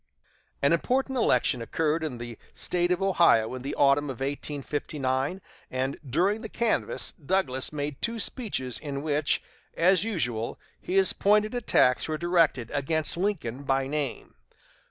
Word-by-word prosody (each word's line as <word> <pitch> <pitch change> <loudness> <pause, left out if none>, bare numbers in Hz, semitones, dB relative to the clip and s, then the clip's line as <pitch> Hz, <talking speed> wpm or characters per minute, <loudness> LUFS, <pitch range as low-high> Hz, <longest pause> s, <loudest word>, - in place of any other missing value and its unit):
An 140 - +4
important 265 - 0
election 125 - +2
occurred 160 +6 0
in 145 -6 -3
the 120 -1 -8 0.2
State 175 0 0
of 180 +2 +1
Ohio 170 - +4
in 130 - -5
the 135 - -4
autumn 140 +1 +4
of 135 -5 -6
1859, 140 +2 -2 0.3
and 130 +2 -2
during 185 - +1
the 225 - -6
canvass 235 0 0
Douglas 135 -6 0
made 145 -1 -4
two 230 0 -1
speeches 195 - -1
in 140 -2 -5
which, 150 -1 +1 0.3
as 185 +2 +4
usual, 125 - -2 0.2
his 190 +1 +2
pointed 210 +2 +3
attacks 215 - +3
were 155 -1 -2
directed 165 -8 +2
against 150 +3 -1
Lincoln 170 - -2
by 135 -1 0
name. 145 -2 -4
150 Hz, 140 wpm, -27 LUFS, 135-185 Hz, 0.3 s, An